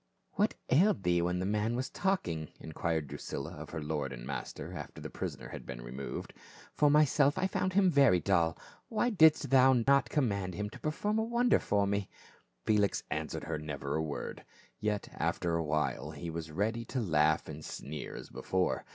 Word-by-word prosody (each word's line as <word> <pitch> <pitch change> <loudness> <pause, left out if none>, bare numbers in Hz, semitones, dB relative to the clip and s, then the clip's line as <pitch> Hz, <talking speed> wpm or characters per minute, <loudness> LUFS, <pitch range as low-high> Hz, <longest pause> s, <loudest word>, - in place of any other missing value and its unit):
"What - - +1 0.2
ailed 155 - +4
thee 85 -1 +3
when 90 +1 0
the 90 - -1
man 105 +3 0
was 125 +1 -2
talking?" 90 - -1
enquired 80 0 -2
Drusilla 70 +2 -5
of - - -8
her 80 -3 -5
lord 75 -3 -2
and - - -7
master, 70 +1 -5
after - - -7
the - - -7
prisoner - - -5
had - - -7
been - - -7
removed; 65 +3 -6 0.2
" - - -20
for 150 - +4
myself 145 0 +4
I 185 - +1
found 185 0 0
him 190 -1 +4
very 135 - +5
dull. 85 -4 +2 0.3
Why 240 +2 +1
didst 160 -8 +5
thou 130 0 +7
not 135 +3 +3
command 100 - 0
him 105 +2 -3
to - - -10
per 155 - -1
form 210 +8 0
a - - +2
wonder 235 +2 +3
for 100 -1 +1
me 100 0 -1 0.3
?" - - -36
Felix 105 -2 +2
answered - - -3
her - - -3
never 70 -2 -4
a 80 - +1
word. 75 -2 -5 0.4
Yet 105 -1 -1
after 85 -1 0
a 85 - 0
while 75 -1 -1
he 80 +2 -6
was 80 0 -5
ready 110 +8 -1
to 130 - -3
laugh 80 -7 +2
and 75 0 -7
sneer 75 +2 -6
as - - -9
before. 95 -1 -1
100 Hz, 195 wpm, -32 LUFS, -, 0.4 s, thou